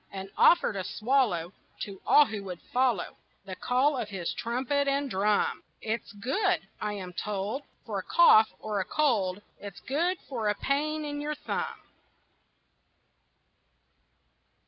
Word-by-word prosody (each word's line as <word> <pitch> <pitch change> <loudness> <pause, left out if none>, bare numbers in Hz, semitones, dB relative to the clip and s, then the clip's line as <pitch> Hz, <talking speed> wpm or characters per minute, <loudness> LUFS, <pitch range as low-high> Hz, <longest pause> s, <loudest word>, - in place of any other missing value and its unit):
And 195 0 -7
offered 345 -11 +5
a 190 - -2
swallow 215 -8 0 0.3
To 195 -3 -6
all 295 - +7
who 215 -4 -5
would 180 -2 -6
follow 250 -6 +1 0.3
The 190 -1 -6
call 265 +7 +2
of 225 -5 -3
his 190 -4 -3
trumpet 260 +4 -1
and 275 -1 0
drum. 205 +2 +1 0.2
It's 225 +1 -3
good, 270 - 0
I 210 0 -2
am 185 -3 -7
told, 205 +7 -3 0.2
For 210 -4 -3
a - - -6
cough 220 - +6
or 210 -2 -3
a - - +1
cold; 205 -10 +1 0.2
It's 200 -3 -9
good 340 +7 0
for 230 -6 -1
a 205 - +1
pain 305 +4 -1
in 290 0 -4
your 300 +1 -3
thumb. - - -4
220 Hz, 145 wpm, -28 LUFS, 200-280 Hz, 0.3 s, all